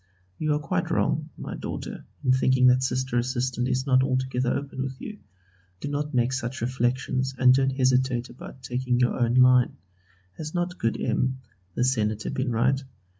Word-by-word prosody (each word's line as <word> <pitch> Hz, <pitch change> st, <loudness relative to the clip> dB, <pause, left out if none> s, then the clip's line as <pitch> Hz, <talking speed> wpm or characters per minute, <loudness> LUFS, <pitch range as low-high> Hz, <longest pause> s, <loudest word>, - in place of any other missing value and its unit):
You 155 Hz, -1 st, +1 dB
are -, -, 0 dB
quite 150 Hz, -, -2 dB
wrong, -, -, 0 dB
my -, -, -6 dB
daughter, -, -, -6 dB, 0.2 s
in 130 Hz, -, +3 dB
thinking 130 Hz, 0 st, +3 dB
that 125 Hz, 0 st, +5 dB
Sister 130 Hz, -1 st, 0 dB
Assistant 125 Hz, 0 st, -1 dB
is 130 Hz, 0 st, 0 dB
not 130 Hz, -2 st, +4 dB
altogether 130 Hz, -1 st, 0 dB
open 140 Hz, -2 st, -3 dB
with 130 Hz, 0 st, -5 dB
you. 215 Hz, -1 st, -8 dB, 0.6 s
Do 145 Hz, -, -4 dB
not 145 Hz, +1 st, -2 dB
make 125 Hz, +1 st, +2 dB
such 130 Hz, -1 st, -3 dB
reflections 130 Hz, +2 st, -1 dB
and 130 Hz, -1 st, +6 dB
don't 135 Hz, 0 st, +1 dB
hesitate 130 Hz, -2 st, +2 dB
about 130 Hz, +1 st, -12 dB
taking 125 Hz, 0 st, -1 dB
your 125 Hz, -1 st, +3 dB
own 120 Hz, 0 st, +1 dB
line. 125 Hz, -1 st, +5 dB, 0.6 s
Has 155 Hz, +1 st, -6 dB
not 175 Hz, +1 st, -2 dB
good 115 Hz, -, 0 dB
M. 130 Hz, +3 st, 0 dB, 0.4 s
the -, -, +1 dB
Senator 110 Hz, -4 st, 0 dB
been 130 Hz, 0 st, -1 dB
right? 130 Hz, +4 st, +2 dB
130 Hz, 175 wpm, -26 LUFS, 125-135 Hz, 0.6 s, and